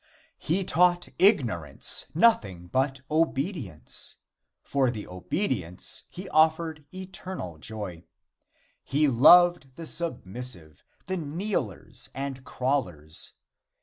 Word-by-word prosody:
He 180 Hz, +5 st, 0 dB
taught 175 Hz, 0 st, +3 dB
ignorance 115 Hz, -, +2 dB
nothing 105 Hz, -, +3 dB
but 135 Hz, +7 st, 0 dB
obedience, 150 Hz, -, -1 dB, 0.5 s
and -, -, -31 dB
for 135 Hz, -3 st, +2 dB
obedience 90 Hz, -, -2 dB
he 185 Hz, +2 st, -8 dB
offered 160 Hz, -1 st, +2 dB
eternal 185 Hz, -, -7 dB
joy. 95 Hz, -4 st, -5 dB, 0.8 s
He 150 Hz, +2 st, +2 dB
loved 150 Hz, +2 st, +6 dB
the 165 Hz, -, -7 dB
submissive 120 Hz, -, -3 dB, 0.2 s
the 190 Hz, 0 st, -2 dB
kneelers 160 Hz, -, -3 dB
and 135 Hz, -1 st, -4 dB
crawlers. 95 Hz, -, -2 dB
140 Hz, 90 wpm, -27 LUFS, -, 0.8 s, loved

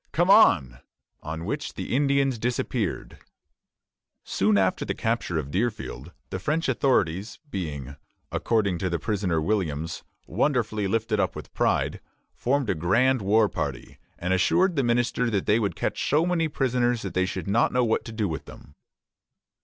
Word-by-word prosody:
come 175 Hz, +3 st, +3 dB
on!" 70 Hz, -, +5 dB, 0.4 s
on 80 Hz, +2 st, -5 dB
which -, -, -4 dB
the -, -, -3 dB
Indians 140 Hz, -3 st, +2 dB
disappeared. 120 Hz, +2 st, -2 dB, 1.0 s
Soon 100 Hz, +1 st, +2 dB
after 95 Hz, -1 st, +1 dB
the -, -, -3 dB
capture 115 Hz, -7 st, -1 dB
of 70 Hz, -2 st, -3 dB
Deerfield, 95 Hz, -, -3 dB, 0.2 s
the 95 Hz, -, -3 dB
French 155 Hz, -, -1 dB
authorities, 100 Hz, -, +1 dB
being, 70 Hz, -7 st, -5 dB, 0.4 s
according 100 Hz, -6 st, 0 dB
to 95 Hz, -, -1 dB
the 85 Hz, -, 0 dB
prisoner 95 Hz, -3 st, -1 dB
Williams, 80 Hz, -3 st, -2 dB, 0.2 s
"wonderfully 110 Hz, -7 st, 0 dB
lifted 110 Hz, +1 st, 0 dB
up 95 Hz, -3 st, 0 dB
with -, -, -9 dB
pride," -, -, 0 dB, 0.3 s
formed 135 Hz, +1 st, 0 dB
a -, -, +2 dB
grand 115 Hz, +10 st, +2 dB
war 105 Hz, +2 st, +4 dB
party, -, -, -5 dB, 0.2 s
and 90 Hz, +2 st, -1 dB
assured 175 Hz, -, +3 dB
the 140 Hz, -, +2 dB
minister 120 Hz, 0 st, +1 dB
that 100 Hz, -4 st, -1 dB
they 105 Hz, +2 st, +3 dB
would 100 Hz, -3 st, -1 dB
catch -, -, -2 dB
so 155 Hz, +4 st, +3 dB
many 175 Hz, -2 st, +1 dB
prisoners 125 Hz, -4 st, 0 dB
that 100 Hz, -, -5 dB
they 95 Hz, 0 st, +1 dB
should 100 Hz, -, -5 dB
not 110 Hz, +5 st, +2 dB
know 125 Hz, 0 st, +2 dB
what 110 Hz, -2 st, +1 dB
to 115 Hz, -, -8 dB
do 110 Hz, -2 st, -1 dB
with 80 Hz, -5 st, -5 dB
them. 70 Hz, -, -13 dB
110 Hz, 160 wpm, -26 LUFS, 90-125 Hz, 1.0 s, on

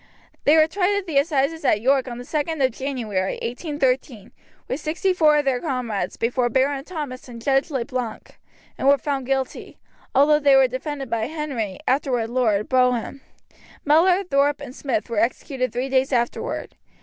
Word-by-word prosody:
They 300 Hz, +3 st, +6 dB
were 310 Hz, -, +7 dB
tried 380 Hz, +4 st, 0 dB
at 400 Hz, -, -3 dB
the 305 Hz, -6 st, +2 dB
assizes 295 Hz, +1 st, 0 dB
at 210 Hz, -, +3 dB
York 265 Hz, +3 st, +2 dB
on 240 Hz, -1 st, -6 dB
the 245 Hz, -, -7 dB
2d 300 Hz, +1 st, -1 dB
of 260 Hz, -, 0 dB
January, 225 Hz, -8 st, -2 dB
1813, 255 Hz, -, -2 dB, 0.4 s
with 260 Hz, -, -3 dB
sixty 335 Hz, +5 st, 0 dB
four 310 Hz, -4 st, +4 dB
of 295 Hz, -, +1 dB
their 260 Hz, -2 st, +1 dB
comrades, 250 Hz, -, -3 dB
before 240 Hz, +1 st, 0 dB
Baron 270 Hz, +3 st, +1 dB
Thomas 290 Hz, -7 st, -7 dB
and 235 Hz, -1 st, -9 dB
Judge 270 Hz, +6 st, +1 dB
Le 265 Hz, -6 st, -2 dB
Blanc, 250 Hz, -5 st, -6 dB, 0.4 s
and -, -, 0 dB
were 280 Hz, 0 st, +6 dB
found 275 Hz, -3 st, -3 dB
guilty, 270 Hz, -1 st, -3 dB, 0.4 s
although 295 Hz, +3 st, +5 dB
they 280 Hz, -2 st, +5 dB
were 265 Hz, -1 st, +6 dB
defended 270 Hz, +2 st, -5 dB
by 225 Hz, -1 st, 0 dB
Henry 275 Hz, -10 st, -4 dB
(afterward 250 Hz, -4 st, 0 dB
Lord) 220 Hz, -5 st, +1 dB
Brougham. 250 Hz, +1 st, +1 dB, 0.6 s
Mellor, 355 Hz, +6 st, +4 dB
Thorpe, 285 Hz, -4 st, +1 dB
and 265 Hz, -3 st, -8 dB
Smith 230 Hz, -7 st, -2 dB
were 230 Hz, -3 st, -1 dB
executed 255 Hz, +3 st, -1 dB
three 250 Hz, +2 st, -2 dB
days 265 Hz, +1 st, +1 dB
afterward. 240 Hz, -2 st, -2 dB
270 Hz, 175 wpm, -23 LUFS, 245-295 Hz, 0.6 s, were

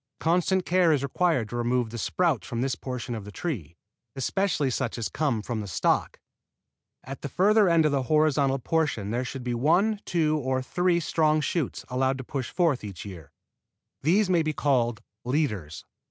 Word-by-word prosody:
Constant 180 Hz, +2 st, +1 dB
care 180 Hz, -2 st, +3 dB
is 145 Hz, -3 st, +1 dB
required 140 Hz, -4 st, +1 dB
to 120 Hz, -, -7 dB
remove 120 Hz, -1 st, 0 dB
the 120 Hz, -, -6 dB
sprouts 155 Hz, -, 0 dB
from 120 Hz, 0 st, -3 dB
this 135 Hz, 0 st, 0 dB
portion 125 Hz, +1 st, -5 dB
of 110 Hz, -3 st, -5 dB
the 105 Hz, -, -9 dB
tree, 100 Hz, -, -5 dB, 0.4 s
especially 150 Hz, 0 st, 0 dB
such 125 Hz, -1 st, -2 dB
as 115 Hz, -, -2 dB
come 145 Hz, -7 st, 0 dB
up 105 Hz, -, -6 dB
from 120 Hz, -3 st, -3 dB
the 105 Hz, -, -6 dB
stock. 85 Hz, -, 0 dB, 0.8 s
At 135 Hz, +1 st, -8 dB
the 145 Hz, -, -5 dB
further 205 Hz, -, +4 dB
end 165 Hz, -2 st, +4 dB
of 150 Hz, -, +3 dB
the 140 Hz, -1 st, +1 dB
horizontal 145 Hz, -1 st, +2 dB
portion 135 Hz, -8 st, -1 dB
there 120 Hz, +2 st, -1 dB
should 130 Hz, 0 st, -6 dB
be 120 Hz, -1 st, -2 dB
one, 180 Hz, -, +2 dB
two, 155 Hz, -3 st, +1 dB
or 130 Hz, -1 st, -1 dB
three 175 Hz, +4 st, +1 dB
strong 155 Hz, -2 st, +2 dB
shoots 155 Hz, -1 st, -2 dB
allowed 130 Hz, +1 st, 0 dB
to 130 Hz, -, -6 dB
push 130 Hz, 0 st, -4 dB
forth 165 Hz, -10 st, +1 dB
each 100 Hz, -3 st, -7 dB
year. 90 Hz, -7 st, -10 dB, 0.7 s
These 185 Hz, +8 st, +3 dB
may 175 Hz, -2 st, +3 dB
be 155 Hz, -1 st, -1 dB
called 120 Hz, -6 st, +1 dB, 0.2 s
leaders. 110 Hz, -, -2 dB
135 Hz, 185 wpm, -26 LUFS, 120-165 Hz, 0.8 s, further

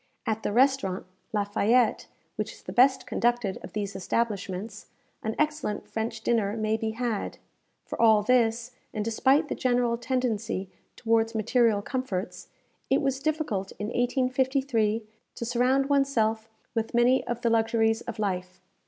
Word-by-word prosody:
At 220 Hz, 0 st, -1 dB
the -, -, -2 dB
restaurant 245 Hz, -6 st, +2 dB, 0.3 s
La 210 Hz, -2 st, +1 dB
Fayette, 220 Hz, +3 st, +2 dB, 0.3 s
which -, -, -3 dB
is -, -, -17 dB
the -, -, -7 dB
best 260 Hz, +1 st, +4 dB
conducted 240 Hz, -5 st, 0 dB
of -, -, -9 dB
these 200 Hz, -2 st, -3 dB
establishments, 200 Hz, 0 st, -3 dB, 0.3 s
an 220 Hz, +1 st, -3 dB
excellent 300 Hz, -8 st, -1 dB
French 220 Hz, 0 st, -3 dB
dinner 220 Hz, -2 st, +1 dB
may 215 Hz, 0 st, +1 dB
be 220 Hz, 0 st, -2 dB
had. 225 Hz, -1 st, -3 dB, 0.5 s
For -, -, -5 dB
all 220 Hz, -2 st, +6 dB
this, 235 Hz, 0 st, +2 dB, 0.2 s
and 210 Hz, -1 st, -1 dB
despite 265 Hz, +7 st, +3 dB
the -, -, -2 dB
general 245 Hz, -2 st, +1 dB
tendency 230 Hz, -6 st, -2 dB, 0.2 s
towards 225 Hz, -1 st, +1 dB
material 220 Hz, -1 st, +2 dB
comforts, 230 Hz, -7 st, -4 dB, 0.4 s
it -, -, +4 dB
was 270 Hz, -1 st, 0 dB
difficult 280 Hz, -11 st, -2 dB
in 205 Hz, +1 st, -3 dB
1853 255 Hz, -2 st, +1 dB, 0.3 s
to 235 Hz, -, -4 dB
surround 250 Hz, +3 st, +2 dB
one's 280 Hz, -1 st, +2 dB
self 220 Hz, -2 st, 0 dB, 0.2 s
with 225 Hz, 0 st, -2 dB
many 245 Hz, +2 st, +4 dB
of 240 Hz, 0 st, -3 dB
the 235 Hz, -2 st, +1 dB
luxuries 225 Hz, 0 st, +2 dB
of 235 Hz, -1 st, -6 dB
life. 185 Hz, -3 st, -3 dB
230 Hz, 150 wpm, -27 LUFS, 215-250 Hz, 0.5 s, all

